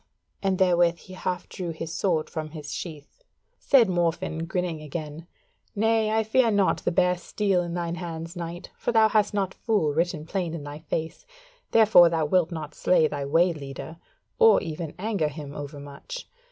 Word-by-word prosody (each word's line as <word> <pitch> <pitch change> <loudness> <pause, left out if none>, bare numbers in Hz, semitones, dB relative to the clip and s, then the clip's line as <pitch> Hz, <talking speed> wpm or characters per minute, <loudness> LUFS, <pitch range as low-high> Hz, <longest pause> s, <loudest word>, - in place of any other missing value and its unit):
and 195 -1 +1
therewith 175 -2 +3
he 185 - -13
half 185 -1 -3
drew 180 -2 -5
his 165 0 -5
sword 170 -3 0
from 155 -1 -5
his 150 -2 -7
sheath. 160 - -8 0.4
Said 250 -5 +5
Morfinn, 165 -2 -1
grinning 175 -3 -2
again: 155 +1 -6 0.5
"Nay, 220 +1 +2
I 220 +1 +2
fear 230 +2 +3
not 200 -3 +2
the - - -1
bare 180 +1 +3
steel 195 0 0
in 170 -1 -4
thine 170 -1 -2
hands, 165 0 -6
Knight; 170 0 -6
for - - -1
thou 220 -1 +5
hast 210 -1 +2
not 195 -2 0
fool 205 -11 0
written 165 -1 -1
plain 170 -1 -2
in 155 - -6
thy 145 +1 -7
face; 160 +1 -4 0.5
therefore 215 -6 +7
thou 165 -2 0
wilt 175 +2 +2
not 155 -2 -6
slay 160 -4 +3
thy 145 -2 -4
way 170 +5 +3
leader, 145 +2 -8 0.4
or 455 -1 +7
even 160 -2 -5
anger 200 -5 0
him 145 -1 -7
over 145 0 -7
much. 145 - -9
170 Hz, 180 wpm, -26 LUFS, 155-190 Hz, 0.5 s, therefore